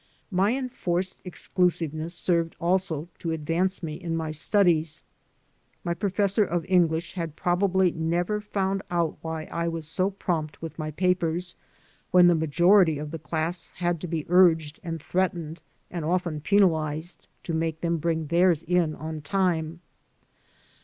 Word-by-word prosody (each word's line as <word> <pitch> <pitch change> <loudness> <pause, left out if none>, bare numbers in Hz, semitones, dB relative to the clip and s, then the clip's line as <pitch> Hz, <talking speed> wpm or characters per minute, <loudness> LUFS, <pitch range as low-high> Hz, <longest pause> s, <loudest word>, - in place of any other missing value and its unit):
My 200 +7 +2
enforced 190 -8 -2
exclusiveness 170 -2 -1
served, 170 -2 0
also, 175 -3 0
to 170 - -3
advance 170 +5 -1
me 155 -2 -3
in 165 0 -4
my 160 -1 -2
studies. 160 -1 +1 0.8
My 170 - 0
professor 200 +2 +1
of 175 -4 -2
English 170 -3 +2
has 170 -3 -3
prob 175 +2 0
ably 190 -2 +3
never 175 +6 -1
found 195 -2 -1
out 170 -3 0
why 160 -1 -4
I 170 +1 -3
was 165 -2 -4
so 185 +4 0
prompt 170 -6 -3
with 165 0 -8
my 155 0 -2
papers, 175 +1 0 0.5
when 180 -1 +6
the 175 - +6
majority 170 +2 +4
of 150 0 -5
the 165 - -5
class 160 +3 -3
had 175 -2 -1
to 180 - -4
be 160 -2 -3
urged 165 -4 +4
and 165 -2 -4
threatened 170 -1 -2 0.3
and 170 -3 -4
often 170 -2 -1
penalized 160 -3 +1 0.2
to 170 - -4
make 160 0 -1
them 170 -1 0
bring 160 0 -1
theirs 170 0 +3
in 170 -2 +1
on 155 0 -6
time. 170 0 0
170 Hz, 150 wpm, -26 LUFS, 160-180 Hz, 0.8 s, when